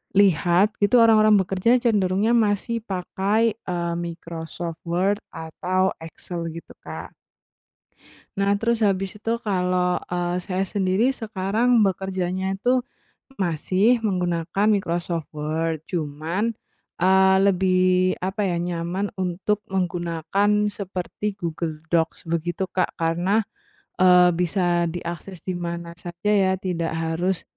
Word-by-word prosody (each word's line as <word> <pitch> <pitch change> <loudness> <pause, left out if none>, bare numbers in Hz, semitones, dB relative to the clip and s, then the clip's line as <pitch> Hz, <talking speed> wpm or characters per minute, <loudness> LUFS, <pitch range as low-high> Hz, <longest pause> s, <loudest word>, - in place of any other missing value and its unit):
lihat, 190 +1 +4
itu 215 +5 +4
orang-orang 215 -2 +6
bekerja 190 +5 +2
cenderungnya 205 -1 +2
masih 230 +1 +1
pakai, 200 +3 0
eee, 170 -1 -3
Microsoft 170 -1 -6
Word 185 +4 +1
atau 185 +4 -1
Excel, 165 +1 -6
gitu, 165 +1 -10
Kak. - - -7 1.3
Nah, 200 0 +2
terus 230 -1 +1
habis 195 0 -1
itu 225 +2 -3
kalau, 180 -3 +1
eee, 175 0 -2
saya 185 0 -2
sendiri 200 +5 +1
sekarang 225 0 +1
bekerjanya 190 -1 -1
tuh, 250 +1 +2 0.5
masih 190 +6 +2
menggunakan 180 -1 0
Microsoft 170 -5 -1
Word, 160 +1 -2
cuman, 170 +7 -2 0.4
eee, 190 +1 +5
lebih, 185 -1 +3
apa 190 +3 -3
ya, 175 - 0
nyaman 175 +3 -2
untuk 190 +3 -1
menggunakan 180 +1 -1 0.2
seperti 195 +1 -4
Google 160 -3 -4
Docs 165 -1 +1
begitu, 170 +3 -1
Kak, 185 - -1
karena, 175 +6 +1 0.5
eee, 180 -1 +6
bisa 175 0 +1
diakses 170 +1 -6
di 185 - -3
mana 170 -1 -5
saja 175 +3 -3
ya, 195 -2 +3
tidak 170 -3 -3
harus, 165 +3 -1
185 Hz, 115 wpm, -23 LUFS, 170-200 Hz, 1.3 s, orang-orang